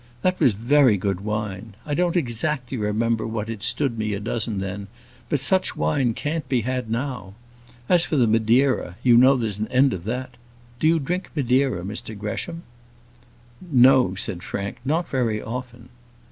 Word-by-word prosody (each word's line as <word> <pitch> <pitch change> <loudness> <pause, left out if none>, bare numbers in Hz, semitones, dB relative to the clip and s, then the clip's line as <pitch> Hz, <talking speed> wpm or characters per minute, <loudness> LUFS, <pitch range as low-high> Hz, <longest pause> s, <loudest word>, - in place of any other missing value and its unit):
That 185 0 +1
was 125 - +4
very 120 +1 +4
good 95 -1 -2
wine. 105 -1 -4
I 150 - -3
don't 175 +2 +1
exactly 130 -1 -1
remember 110 +1 0
what 110 0 -4
it 110 -3 -7
stood 120 0 0
me 110 -1 -1
a 100 - -3
dozen 110 0 -2
then; 100 +1 -5 0.4
but 145 - +1
such 185 +8 +1
wine 130 -6 +1
can't 150 -2 -3
be 125 -3 +1
had 125 0 -3
now. 115 -5 -4 0.5
As 175 -2 +5
for 160 - -2
the 130 -4 +4
Madeira, 115 -2 +2
you 120 -2 +6
know 130 +3 +6
there's 110 -5 -2
an 110 - -2
end 130 +1 +3
of 90 -1 -6
that. 125 +2 -4 0.4
Do 155 - +2
you 165 +1 +4
drink 175 +6 -3
Madeira, 130 - +1
Mr 105 +2 -4
Gresham?" 165 - -4 1.0
"No," 130 - +4
said 90 -2 0
Frank, 100 +2 -5
"not 160 +6 0
very 115 -5 -1
often." 120 +1 -7
120 Hz, 170 wpm, -23 LUFS, 105-135 Hz, 1.0 s, you